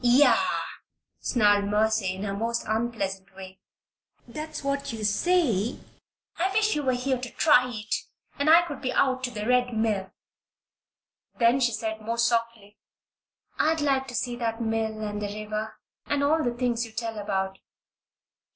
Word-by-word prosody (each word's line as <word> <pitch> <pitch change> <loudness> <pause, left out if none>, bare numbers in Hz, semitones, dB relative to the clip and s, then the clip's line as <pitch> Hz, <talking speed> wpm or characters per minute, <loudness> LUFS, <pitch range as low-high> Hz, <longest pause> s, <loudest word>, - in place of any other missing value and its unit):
"Yah!" 250 +5 +5 0.7
snarled 205 -4 +3
Mercy, 210 -2 +1
in 190 - -6
her 200 -1 -2
most 230 +3 -2
unpleasant 195 -4 -2
way. 190 -1 -10 0.7
"That's 305 +4 -6
what 275 -1 -2
you 225 -2 -6
say. 235 - +1 0.6
I 375 +3 +1
wish 430 +1 +3
you 300 - 0
were 260 -2 +1
here 255 +1 -1
to 250 -1 -5
try 250 -4 +4
it, 215 -2 -5 0.5
and 285 +2 +2
I 335 +2 +8
could 320 -4 -7
be 255 - -1
out 260 -1 +1
to - - -3
the 210 -3 -5
Red 250 -2 +2
Mill." 210 -4 0 1.3
Then 235 +2 +4
she 245 -2 +2
paid 220 -1 -3
more 230 +2 -3
softly: 230 -3 -1 0.8
"I'd 320 +1 +2
like 270 -2 +1
to 245 - -7
see 245 0 -1
that 230 -1 -2
mill 220 -1 -1
and 210 0 -4
the 205 - -2
river 215 +1 -4 0.3
and 285 0 0
all 310 +2 +3
the 240 -1 -1
things 240 -1 0
you 225 -2 -9
tell 225 -1 -4
about." 190 -2 -2
235 Hz, 160 wpm, -26 LUFS, 215-260 Hz, 1.3 s, I